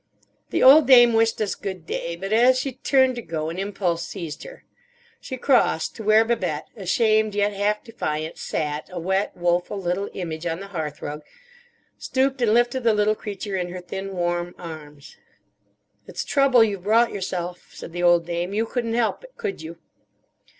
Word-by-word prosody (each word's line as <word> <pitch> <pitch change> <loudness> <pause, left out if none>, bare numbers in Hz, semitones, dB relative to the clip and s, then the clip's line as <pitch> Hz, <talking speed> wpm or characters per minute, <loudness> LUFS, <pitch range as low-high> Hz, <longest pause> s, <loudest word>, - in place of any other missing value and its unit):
The - - 0
old 280 +2 +8
dame 240 -3 +7
wished 225 0 +2
us 210 - 0
good 190 -4 -6
day; 170 0 -4
but 195 +4 -4
as 250 +3 +5
she 265 +1 -2
turned 260 +1 +2
to - - -3
go 160 -5 -4
an 170 +3 -5
impulse 190 -4 -2
seized 170 -6 -7
her. - - -12 0.6
She 260 - -7
crossed 245 - +2
to 220 - -8
where 215 +1 +5
Babette, 180 -10 -2
ashamed, 215 +1 +1
yet 205 0 +1
half 205 +1 0
defiant, 155 -9 -4
sat 150 0 -3
a 180 - -5
wet, 190 +4 -1
woeful 175 +3 0
little 185 +2 -2
image 165 -2 -4
on 165 0 -2
the 195 0 -9
hearthrug, 150 -3 -5 0.8
stooped 265 0 0
and 230 -3 +3
lifted 240 +2 +2
the 225 -2 +3
little 210 +1 +3
creature 205 -1 -6
in 180 -1 -2
her 180 +1 -6
thin, 190 +2 -6
worn 175 0 -2
arms. 150 -4 -10 0.9
"It's - - -5
trouble 275 -4 +4
you've 200 -4 -1
brought 225 +5 +3
yourself," 180 -2 -5
said - - -10
the 175 +1 -4
old 175 -1 +4
dame. 175 +3 -3
"You 220 +2 +1
couldn't 230 -1 -2
help 235 - 0
it, - - -16
could 430 -4 -4
you?" 165 +1 -8
195 Hz, 180 wpm, -23 LUFS, 175-230 Hz, 0.9 s, old